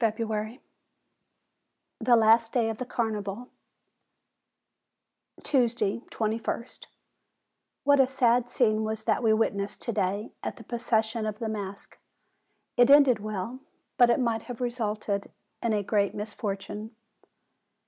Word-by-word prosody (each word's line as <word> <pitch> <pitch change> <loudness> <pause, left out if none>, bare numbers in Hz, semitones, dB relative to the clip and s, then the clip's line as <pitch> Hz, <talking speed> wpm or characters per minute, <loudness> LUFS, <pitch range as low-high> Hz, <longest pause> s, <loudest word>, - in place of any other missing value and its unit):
150 225 0 +1
FEBRUARY 220 +3 -4 1.4
THE 240 +1 +4
LAST 225 0 +5
DAY 230 -3 +2
OF 220 - -8
THE 255 - -4
CARNIVAL 220 -1 -3 1.9
Tuesday, 240 -6 +1
2ist. 225 +2 -3 1.0
What 285 0 +4
a 265 - +6
sad 245 -2 +2
scene 220 -5 +2
was 220 0 -3
that 220 -1 +1
we 225 -2 +3
witnessed 205 -2 0
to 235 - -2
day 200 0 -1
at - - -4
the 230 - -12
procession 225 -1 -1
of 210 -1 -4
the 225 -1 -3
masks! 200 -2 -7 0.8
It 245 +1 +6
ended 280 -5 +7
well; 215 +4 -5 0.4
but 245 -1 +7
it 235 - +3
might 230 -3 0
have 245 - -6
resulted 215 -5 -2 0.3
in 230 - 0
a 210 -1 +1
great 200 0 +1
misfortune. 210 +1 -5
225 Hz, 130 wpm, -27 LUFS, 210-240 Hz, 1.9 s, ended